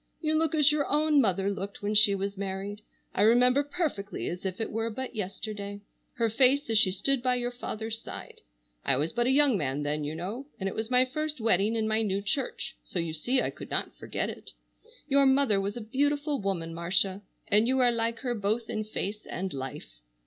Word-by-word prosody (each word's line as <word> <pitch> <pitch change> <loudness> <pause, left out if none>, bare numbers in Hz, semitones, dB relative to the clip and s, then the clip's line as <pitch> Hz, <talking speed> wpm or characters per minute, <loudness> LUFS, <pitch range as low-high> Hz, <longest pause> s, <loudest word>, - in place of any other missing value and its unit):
You 310 -2 0
look 320 +1 +2
as 300 -1 +5
your 295 -1 +1
own 300 0 +4
mother 195 -3 +1
looked 200 +1 -6
when 205 +1 0
she 210 -1 +5
was 200 +1 -3
married. 200 +1 -4 0.3
I - - 0
remember 250 +5 +5
perfectly 290 - -3
as 180 +2 -6
if 185 +2 -5
it 225 - -2
were 225 +1 -1
but 250 +3 -6
yesterday, 205 0 -5 0.3
her 230 -1 +1
face 255 +4 +3
as 220 - +5
she 190 -4 +4
stood 245 +8 +1
by 250 0 +2
your 245 0 -1
father's 225 -2 -4
side. - - -9 0.4
I - - +3
was 150 +4 -1
but 240 +1 +1
a - - +4
young 275 -6 +4
man 140 0 -1
then, 150 +1 -1
you 150 +2 -3
know, 205 +11 -5
and 195 - -2
it 195 - -2
was 220 +1 -3
my 250 0 +5
first 305 +3 -3
wedding 220 0 +2
in 220 -1 0
my 220 +1 +2
new 200 -2 -1
church, 255 +6 -2
so - - -6
you 165 -2 -1
see 245 +12 +1
I - - -1
could - - -10
not - - 0
forget - - -3
it. - - -11 0.5
Your 280 -1 +5
mother 265 -7 +4
was 200 +3 -3
a - - -4
beautiful 285 +4 0
woman, 175 -4 -2
Marcia, 185 +3 0 0.3
and 210 +3 +4
you 260 +1 +2
are 250 -2 +5
like 230 0 -1
her 245 -2 -1
both 220 +1 -1
in 215 - -2
face 210 0 -4
and 190 +1 -4
life." 135 - -7
220 Hz, 215 wpm, -28 LUFS, 195-260 Hz, 0.5 s, as